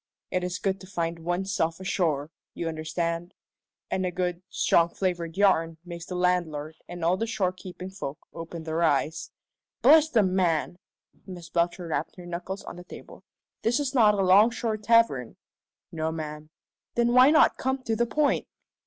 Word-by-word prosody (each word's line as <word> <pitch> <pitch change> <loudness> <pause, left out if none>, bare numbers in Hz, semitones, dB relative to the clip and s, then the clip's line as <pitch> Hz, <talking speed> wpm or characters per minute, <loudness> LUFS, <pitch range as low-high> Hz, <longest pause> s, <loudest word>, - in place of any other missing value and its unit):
It 185 - 0
is 180 0 -2
good 195 -1 -2
to 190 - -11
find 170 -2 -3
one's 175 +4 -2
self 165 -4 0
ashore, 165 -6 -1 0.2
you 170 - -3
understand? 165 +2 -3 0.6
And 190 - 0
a 185 - 0
good, 180 0 -2
strong 170 0 +3
flavoured 175 -2 -3
yarn 165 -5 +3
makes 170 -1 -8
the 180 - -5
landlord 165 -4 0
and 175 -2 -5
all 175 +2 +3
the 225 - -2
shore 205 -5 0
keeping 185 0 -9
folk 155 -7 -6 0.2
open 165 0 -7
their 160 +1 -2
eyes 155 0 +1 0.3
" - - -66
"Bless 310 +4 +7
the 225 -7 +3
man!" 180 -2 0 0.5
Miss 175 -3 -9
Belcher 175 +1 0
rapped 160 -2 -3
her 180 - -11
knuckles 180 +3 -5
on - - -9
the 175 - -9
table. - - -12 0.4
"This 240 +5 +1
is 280 -2 -2
not 215 -5 +5
a 195 - +1
'longshore 215 +4 +4
tavern." 215 - +2 0.6
"No, 160 -1 -2
ma'am." 155 -1 -6 0.5
"Then 240 0 +2
why 255 +2 +8
not 310 +1 +5
come 265 0 -2
to 225 -2 -1
the 235 +1 +1
point?" 295 +5 +1
180 Hz, 175 wpm, -27 LUFS, 165-200 Hz, 0.6 s, why